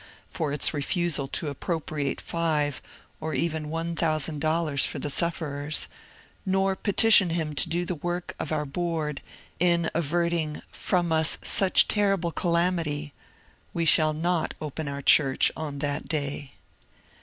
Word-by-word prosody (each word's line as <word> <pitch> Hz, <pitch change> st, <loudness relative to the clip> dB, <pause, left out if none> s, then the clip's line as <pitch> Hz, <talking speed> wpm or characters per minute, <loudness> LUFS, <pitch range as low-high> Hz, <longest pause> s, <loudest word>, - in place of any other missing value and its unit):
" -, -, -31 dB
for 155 Hz, -4 st, -1 dB
its 145 Hz, -, +2 dB
refusal 155 Hz, -1 st, 0 dB
to 150 Hz, -, -2 dB
appropriate 145 Hz, -1 st, -3 dB
five 150 Hz, -4 st, -1 dB, 0.4 s
or 155 Hz, 0 st, -4 dB
even 160 Hz, -2 st, -2 dB
one 165 Hz, +1 st, -3 dB
thousand 155 Hz, -2 st, 0 dB
dollars 155 Hz, -2 st, +1 dB
for -, -, 0 dB
the 145 Hz, -, -4 dB
sufferers; 150 Hz, -2 st, -2 dB, 0.6 s
nor 190 Hz, 0 st, +1 dB
petition 205 Hz, -1 st, +5 dB
Him 160 Hz, -2 st, -2 dB
to -, -, +2 dB
do 175 Hz, +1 st, -1 dB
the 180 Hz, -, -2 dB
work 175 Hz, +2 st, -4 dB
of 155 Hz, -, -4 dB
our 150 Hz, -1 st, -1 dB
board 155 Hz, -1 st, -3 dB, 0.4 s
in 170 Hz, -1 st, +2 dB
averting 170 Hz, 0 st, 0 dB
*^ -, -, -9 dB
from 175 Hz, -2 st, -1 dB
us 160 Hz, 0 st, +4 dB
such 190 Hz, -2 st, +4 dB
terrible 195 Hz, -5 st, +1 dB
calamity," 170 Hz, -4 st, -1 dB, 0.6 s
we 170 Hz, -, 0 dB
shall 155 Hz, -1 st, +5 dB
not 165 Hz, +1 st, -1 dB
open 155 Hz, 0 st, -5 dB
our 140 Hz, 0 st, -5 dB
church 135 Hz, -2 st, +4 dB
on 150 Hz, -3 st, -5 dB
that 145 Hz, +1 st, -2 dB
day. 145 Hz, -3 st, -3 dB
160 Hz, 145 wpm, -26 LUFS, 150-170 Hz, 0.6 s, petition